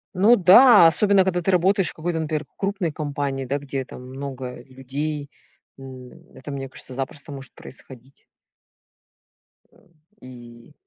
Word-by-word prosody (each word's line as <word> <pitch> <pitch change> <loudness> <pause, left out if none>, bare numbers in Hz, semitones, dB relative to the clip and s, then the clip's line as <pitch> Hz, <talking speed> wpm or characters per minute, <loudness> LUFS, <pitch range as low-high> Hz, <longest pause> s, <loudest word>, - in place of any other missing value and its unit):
Ну 205 +6 +5
да, 205 0 +7
особенно, 200 +3 +3
когда 180 -1 -1
ты 190 - 0
работаешь 185 0 +2
в - - -9
какой-то, 165 +1 -3
например, 155 -1 -3
крупной 195 -4 -2
компании, 145 -2 -4
да, 140 +3 -2
где 135 -1 -5
там - - -11
много 130 -2 -7
людей. 140 +3 -6 0.5
М, 130 -2 -11 0.2
это, 145 - -10
мне 135 -1 -5
кажется, 130 0 -9
запросто 135 +2 -6
может 135 -2 -10
происходить. 130 0 -15 1.5
Э, - - -25 0.4
и 120 0 -14
145 Hz, 140 wpm, -22 LUFS, 130-175 Hz, 1.5 s, да